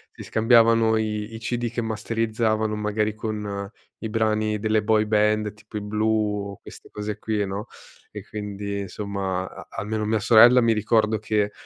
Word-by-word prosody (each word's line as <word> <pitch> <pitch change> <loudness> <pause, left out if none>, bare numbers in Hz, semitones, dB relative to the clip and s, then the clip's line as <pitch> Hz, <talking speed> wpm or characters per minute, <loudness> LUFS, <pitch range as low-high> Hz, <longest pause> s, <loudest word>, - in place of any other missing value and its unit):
si - - -9
scambiavano 115 0 +4
i 105 0 -3
i - - -7
CD 120 +1 -2
che 120 - -2
masterizzavano 110 0 -1
magari 105 0 -1
con 105 -2 -4 0.3
i 110 - -5
brani 110 -1 0
delle 110 0 +1
boy 110 0 +3
band, 105 0 +1
tipo 105 0 -10
i - - -4
Blue, 105 -1 0
o - - -14
queste - - -13
cose 105 0 -5
qui, 105 -2 -1
no. 100 +4 -5 0.4
E - - -8
quindi 100 -1 -5
insomma 100 -2 -3
a - - -11
almeno 105 +1 -3
mia 110 +1 +1
sorella 120 +4 +7
mi 115 -1 +3
ricordo 110 0 +2
che, 105 -1 0
110 Hz, 165 wpm, -24 LUFS, 105-110 Hz, 0.4 s, sorella